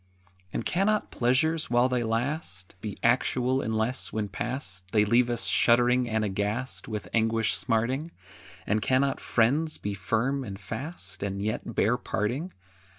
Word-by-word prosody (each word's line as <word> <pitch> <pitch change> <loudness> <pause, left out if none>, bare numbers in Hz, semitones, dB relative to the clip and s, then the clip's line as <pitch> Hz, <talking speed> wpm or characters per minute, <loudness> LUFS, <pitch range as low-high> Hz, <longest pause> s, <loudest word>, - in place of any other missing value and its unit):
] 90 0 -33
And 115 - -3
cannot 205 +4 +1
pleasures, 150 +6 +2
while 120 +1 +4
they 125 -1 0
last, 115 - -3
Be 105 -3 -5
actual 125 +2 +2
unless, 110 +3 0
when 105 -2 -2
past, 95 -4 -5
They 105 -1 +4
leave 120 +3 +3
us 120 -1 -1
shuddering 120 +1 +4
and 110 -1 +1
aghast, 105 +6 -2
With 105 -2 -4
anguish 115 -1 +2
smarting? 125 +7 0 0.6
And 105 +1 +1
cannot 130 +3 +2
friends 145 +8 +2
be 105 - -4
firm 115 +8 0
and 100 -4 -7
fast, 110 - -5
And 100 -1 -2
yet 110 +2 -3
bear 115 +4 +3
parting? 125 +10 -2
115 Hz, 150 wpm, -27 LUFS, 105-130 Hz, 0.6 s, while